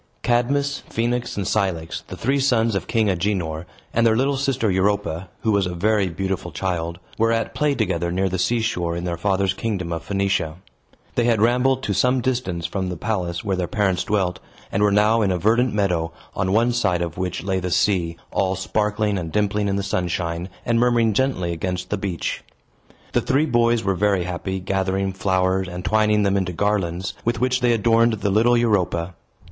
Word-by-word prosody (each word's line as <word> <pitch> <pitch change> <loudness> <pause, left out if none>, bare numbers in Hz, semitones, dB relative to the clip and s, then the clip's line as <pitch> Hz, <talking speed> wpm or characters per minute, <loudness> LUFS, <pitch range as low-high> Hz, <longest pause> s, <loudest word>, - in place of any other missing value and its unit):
Cadmus, 140 +4 +1
Phoenix, 120 0 -1
and 100 - -1
Cilix, 90 -6 -1
the - - -8
three 140 +1 +1
sons 120 -5 +2
of 95 -3 -2
King 110 -2 +1
Agenor, 90 -4 -1 0.3
and 115 - +2
their 115 -1 +4
little 135 +3 +2
sister 135 -5 0
Europa 95 -2 0
(who 110 - +1
was 100 -3 +2
a 90 - -4
very 100 +1 +2
beautiful 95 +2 -3
child), 85 -3 -2 0.2
were 115 +1 +3
at 115 -1 -1
play 150 -1 +1
together 85 -7 -1
near 95 +2 +1
the 95 0 -2
seashore 110 -6 0
in 85 - -4
their 85 -1 -2
father's 95 +1 +1
kingdom 95 -5 -3
of 80 - -3
Phoenicia. 95 -4 -1 0.6
They 120 - +1
had 115 -3 +3
rambled 125 +4 +2
to 100 - -1
some 125 +6 +2
distance 120 -9 -2
from 95 +1 -2
the 90 - -4
palace 90 -4 -2
where 100 -2 0
their 90 -1 -2
parents 95 -2 0
dwelt, 95 -4 0 0.3
and 100 - 0
were 105 -1 +4
now 105 +3 +4
in 100 - +2
a 90 - +1
verdant 115 +6 +2
meadow, 90 -6 0 0.2
on 95 0 0
one 115 +4 +3
side 100 -8 +1
of 85 +1 -5
which 90 -2 -3
lay 95 0 0
the 90 0 -3
sea, 85 -3 +1
all 95 0 +1
sparkling 105 +1 0
and 80 -2 -5
dimpling 105 +1 +1
in 100 - 0
the 100 - -1
sunshine, 85 -2 -2 0.2
and 115 -1 +2
murmuring 120 -2 +3
gently 100 -7 0
against 90 +2 -4
the - - +2
beach. 95 -4 -3 0.7
The - - +3
three 140 +4 +2
boys 120 -4 +2
were 95 0 +1
very 95 0 +1
happy, 95 +2 -3
gathering 95 +1 -1
flowers, 95 0 +1
and 90 0 -7
twining 105 0 +3
them 100 0 +2
into 90 -2 -1
garlands, 90 -2 -1
with 120 0 0
which 130 0 +1
they 120 -1 +3
adorned 115 +1 +3
the 105 -2 -1
little 115 +4 +4
Europa. 95 -6 +1
100 Hz, 195 wpm, -22 LUFS, 90-115 Hz, 0.7 s, their